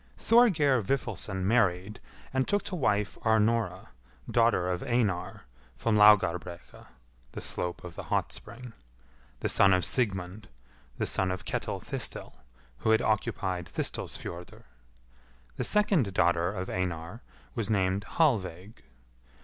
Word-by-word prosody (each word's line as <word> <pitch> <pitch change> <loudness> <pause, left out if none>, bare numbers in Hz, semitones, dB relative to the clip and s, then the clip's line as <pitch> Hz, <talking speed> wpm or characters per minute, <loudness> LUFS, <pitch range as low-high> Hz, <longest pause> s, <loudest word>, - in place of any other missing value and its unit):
Thorgeir 160 - +4
Vifilsson 100 -5 -2
married, 100 -2 +1 0.3
and 130 0 +1
took 205 0 +1
to 190 - -4
wife 105 - 0
Arnora, 110 -4 +1 0.4
daughter 115 -6 +2
of 90 - -2
Einar, 115 -8 -1 0.3
from 115 -2 +1
Laugarbrekka 90 -5 +3 0.5
(the - - -5
slope 90 -1 -3
of 90 -1 -8
the - - -7
hot - - -1
spring), 120 0 -9 0.7
the - - 0
son 95 -1 +4
of 90 -1 +2
Sigmund, 100 -4 -2 0.5
the - - -1
eon 95 - 0
of 90 0 -4
Ketil - - -3
Thistil, - - -5 0.5
who - - -1
had 110 0 +4
occupied 100 -5 -1
Thistilsfjordr. 85 0 -5 0.9
The - - -1
second 195 - +2
daughter 85 -1 +2
of 95 -2 -5
Einar 90 +3 -4 0.3
was 115 -4 -3
named 100 -1 +1
Hallveig. 105 - -1
105 Hz, 125 wpm, -29 LUFS, 90-115 Hz, 0.9 s, Thorgeir